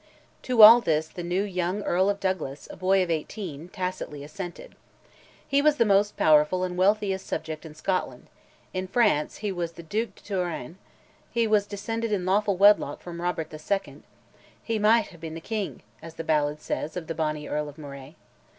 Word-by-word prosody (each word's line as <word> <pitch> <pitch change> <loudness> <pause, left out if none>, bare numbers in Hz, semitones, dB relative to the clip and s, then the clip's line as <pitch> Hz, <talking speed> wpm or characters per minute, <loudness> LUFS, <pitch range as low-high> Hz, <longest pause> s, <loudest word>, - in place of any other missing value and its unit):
To 245 -4 +5
all 230 +3 +11
this 155 -5 0
the 175 - -8
new 175 +3 0
young 185 0 -2
Earl 185 +2 +2
of 200 0 -1
Douglas, 175 -8 -3
a - - -9
boy 185 +1 +2
of 175 - -3
eighteen, 165 -1 -5
tacitly 180 -6 -5
assented. 175 +4 -8 0.7
He 280 0 +3
was 300 0 +4
the 235 - +4
most 205 0 +2
powerful 155 +4 +4
and 180 -1 -3
wealthiest 195 0 +1
subject 160 0 -5
in 155 - -13
Scotland; 185 +4 -2 0.5
in 185 0 -3
France 205 -9 +1
he 205 - 0
was 175 -3 -3
Duc 165 -1 -12 0.3
de - - -20
Touraine; 180 - -4 0.5
he 235 -1 +1
was 210 -2 +2
descended 225 +2 -3
in 190 -4 0
lawful 200 +1 +1
wedlock 205 +2 +5
from 170 -1 -8
Robert 165 -3 -3
II.; 195 +6 -3 0.6
"he 225 -2 -1
micht 220 +1 +4
ha'e 170 - -15
been 160 -1 -7
the - - -5
king," 210 +2 -4 0.2
as 165 0 -10
the 165 - -5
ballad 150 -1 +1
says 155 +2 -4
of 175 - -5
the 165 - -4
bonny 155 -2 -2
Earl 150 0 -2
of 145 - -14
Moray. 140 0 -10
180 Hz, 185 wpm, -26 LUFS, 160-205 Hz, 0.7 s, all